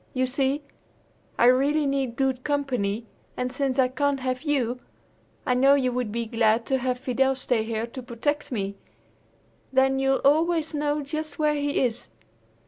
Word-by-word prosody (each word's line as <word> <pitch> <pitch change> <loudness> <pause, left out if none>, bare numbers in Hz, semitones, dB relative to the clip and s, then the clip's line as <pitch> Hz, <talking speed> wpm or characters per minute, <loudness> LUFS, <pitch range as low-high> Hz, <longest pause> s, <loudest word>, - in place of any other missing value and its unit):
You 255 0 +2
see, 275 +2 -1 0.7
I - - +4
really 280 +5 +4
need 270 -3 -1
good 265 -1 0
company, 250 -7 -1 0.3
and 250 0 -2
since 270 0 -1
I 260 -1 +4
can't 275 +2 0
have 255 0 -2
you, 255 -5 0 0.7
I 255 - +2
know 270 +3 +5
you 255 -3 +1
would 245 -3 -2
be 235 +1 -2
glad 225 0 +2
to 265 -1 0
have 250 0 -1
Fidel 265 +1 +1
stay 245 -3 0
here 225 0 -2
to 235 +2 -8
protect 285 +6 -3
me. 200 -4 -3 0.9
Then 265 0 +3
you'll 270 0 +2
always 320 +2 +3
know 295 0 -1
just 310 +1 -5
where 300 -1 +2
he 290 -1 0
is." 240 -1 -2
265 Hz, 165 wpm, -25 LUFS, 245-285 Hz, 0.9 s, know